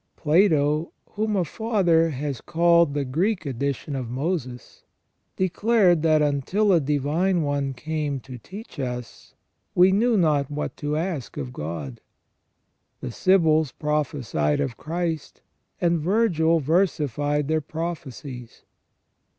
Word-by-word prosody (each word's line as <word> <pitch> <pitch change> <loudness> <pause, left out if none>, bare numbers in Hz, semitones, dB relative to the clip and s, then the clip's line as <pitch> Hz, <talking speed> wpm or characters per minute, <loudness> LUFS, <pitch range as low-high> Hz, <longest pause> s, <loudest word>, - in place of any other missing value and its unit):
Plato, 155 -2 +2 0.2
whom 215 0 -1
a 185 -3 +1
Father 175 -6 +2
has 140 -3 -4
called 170 -2 +3
the 145 -1 0
Greek 175 +7 0
edition 140 +1 -3
of 130 -3 -4
Moses, 130 -2 -4 0.5
declared 190 -2 +3
that 155 -1 +3
until 165 +9 +1
a 170 - +5
Divine 150 +6 +1
One 140 -2 -1
came 150 0 -3
to 130 -2 -10
teach 195 - -11
us, 125 -2 -6 0.4
we 180 +2 +6
knew 225 +3 +3
not 150 -6 +2
what 150 0 -4
to 150 +1 -2
ask 160 -7 -4
of 130 -4 -5
God. 75 - -6 1.0
The 130 - -5
Sibyls 160 -3 +3
prophesied 130 - -1
of 120 - -2
Christ, 165 -2 -4 0.4
and 170 -1 +2
Virgil 170 -3 +2
versified 150 -3 0
their 155 0 +1
prophecies. 145 -6 -7
155 Hz, 120 wpm, -24 LUFS, 140-175 Hz, 1.0 s, we